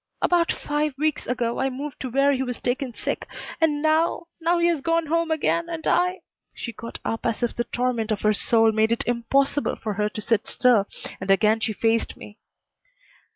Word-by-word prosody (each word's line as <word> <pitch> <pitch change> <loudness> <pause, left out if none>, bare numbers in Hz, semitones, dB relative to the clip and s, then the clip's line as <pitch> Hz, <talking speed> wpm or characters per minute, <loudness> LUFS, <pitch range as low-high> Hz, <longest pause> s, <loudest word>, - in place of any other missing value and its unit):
"About 345 -1 +2
five 295 -1 -2
weeks 305 +1 -1
ago 235 -1 -1
I 270 - +1
moved 275 +2 -6
to 260 - -4
where 275 +3 +3
he 265 -2 0
was 250 -2 -3
taken 255 +1 -2
sick. - - -4 0.3
And 300 -2 +2
now 315 +2 +2 0.2
now 340 +2 +2
he 340 - +2
has 335 -4 +1
gone 330 +2 +1
home 335 +2 0
again 335 +2 0
and 330 -1 -5
I 360 +1 +2 0.2
" - - -55
She 235 - -6
got 230 +2 -8
up 225 - -2
as 230 0 -1
if 240 - -1
the 240 - -1
torment 240 -2 -1
of 210 - -1
her 215 0 +3
soul 225 +1 +3
made 220 +1 +2
it 230 - 0
impossible 270 +4 +1
for 215 - -4
her 210 +1 0
to 215 - -7
sit 215 0 0
still, 235 -6 +3 0.3
and 190 - -6
again 215 +3 +4
she 220 0 -1
faced 225 +2 0
me. 210 +2 -12
250 Hz, 205 wpm, -24 LUFS, 225-310 Hz, 0.3 s, again